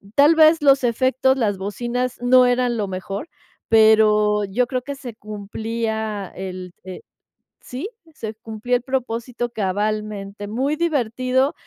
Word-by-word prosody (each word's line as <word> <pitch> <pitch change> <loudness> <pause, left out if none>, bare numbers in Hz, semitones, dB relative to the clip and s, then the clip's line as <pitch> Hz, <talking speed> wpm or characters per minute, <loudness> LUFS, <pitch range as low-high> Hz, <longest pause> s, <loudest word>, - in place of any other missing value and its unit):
Tal 295 +3 +6
vez 315 0 +6
los 275 -2 +5
efectos, 260 +2 +2
las 210 -5 0
bocinas, 240 +6 -3
no 250 +1 +6
eran 245 -1 +1
lo 205 -2 -1
mejor, 195 - -5 0.4
pero 215 -1 +5
yo 215 +6 0
creo 255 -1 -2
que 280 +2 -5
se 255 -4 -8
cumplía 220 -1 -4
el, 185 -1 -7
eh 185 0 -8 0.6
sí, 265 +11 -6 0.2
se 220 -7 -6
cumplía 225 +2 -3
el 245 - -10
propósito 240 -2 -3
cabalmente, 205 0 -3
muy 260 +8 -1
divertido, 260 -3 0
230 Hz, 135 wpm, -21 LUFS, 210-255 Hz, 0.6 s, Tal